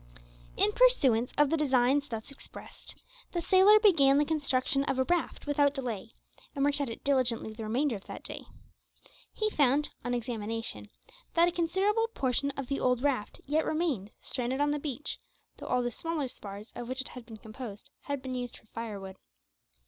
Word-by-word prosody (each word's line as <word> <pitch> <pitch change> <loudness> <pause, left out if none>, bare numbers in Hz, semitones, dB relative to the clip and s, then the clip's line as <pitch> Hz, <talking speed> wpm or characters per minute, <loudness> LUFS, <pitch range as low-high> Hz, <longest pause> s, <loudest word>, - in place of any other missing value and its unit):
In 420 - +4
pursuance 275 - +4
of 295 -1 +4
the 325 - +3
designs 275 -1 +3
thus 225 +2 -5
expressed, 275 - -9 0.4
the 350 - 0
sailor 380 +5 +6
began 295 -10 +5
the 295 - +4
construction 275 -3 +1
of 265 - -1
a 260 - +3
raft 345 +4 -1
without 290 -1 +2
delay, 235 -6 -4 0.5
and 280 0 +2
worked 285 0 +2
at 275 - -1
it 230 - -8
diligently 250 -5 +2
the 225 - -9
remainder 240 +3 0
of 195 - -16
that - - -8
day. - - -6 0.9
He 430 -1 -1
found, 290 -1 +3
on 245 0 -1
examination, 225 - -4 0.5
that 340 +1 +6
a - - +1
considerable 385 +7 +1
portion 265 +1 +1
of 275 - -3
the 275 +1 -1
old 250 0 +1
raft 260 -8 -1
yet 305 +3 +1
remained 305 - -1
stranded 255 +1 -2
on 290 0 +2
the 295 - -1
beach, 295 +1 -4 0.4
though - - -8
all 250 0 +1
the 240 - -1
smaller 320 +2 -2
spars 205 -2 -9
of 240 0 -6
which 260 +1 +1
it 265 - -4
had 250 - -9
been 225 -1 -11
composed 220 -1 -9
had 285 -2 -3
been 260 -1 -4
used 245 -1 -4
for - - -20
firewood. 205 -4 -7
270 Hz, 185 wpm, -30 LUFS, 235-295 Hz, 0.9 s, sailor